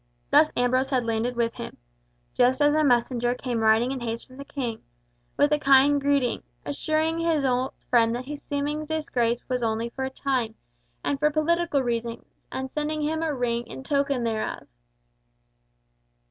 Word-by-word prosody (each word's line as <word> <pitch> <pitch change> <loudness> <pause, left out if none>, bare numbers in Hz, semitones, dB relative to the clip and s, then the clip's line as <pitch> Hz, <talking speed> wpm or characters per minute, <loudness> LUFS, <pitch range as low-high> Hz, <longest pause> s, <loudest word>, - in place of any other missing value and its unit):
Thus 305 +2 +6
Ambrose 255 +2 +2
had 255 -3 +1
landed 230 +2 -1
with 230 -1 0
him, - - -7 0.6
just 255 +2 +3
as 290 0 +4
a 310 0 +3
messenger 245 -2 +2
came 250 -2 -3
riding 220 +3 +3
in 270 - -3
haste 230 -1 -4
from 255 - -16
the 280 - -7
King, 270 -6 -4 0.6
with 290 +1 +4
a 300 - +3
kind 275 +1 +5
greeting, 280 -4 +1 0.2
assuring 310 - 0
his 325 -4 +1
old 255 0 0
friend 230 -1 +3
that 250 +1 -5
his 290 +1 -7
seeming 290 +2 -2
disgrace 245 -7 -1
was 250 -1 -1
only 225 0 -1
for 265 +2 -5
a 265 - -1
time, 260 -4 -2 0.5
and 280 - -1
for 300 +1 +4
political 310 -1 +1
reasons, 235 -1 -3 0.3
and 265 0 -4
sending 300 0 -2
him 315 +2 -1
a 325 -1 0
ring 240 -3 -1
in 265 - -8
token 280 -2 0
thereof. 220 -2 -3
265 Hz, 170 wpm, -26 LUFS, 240-290 Hz, 0.6 s, Thus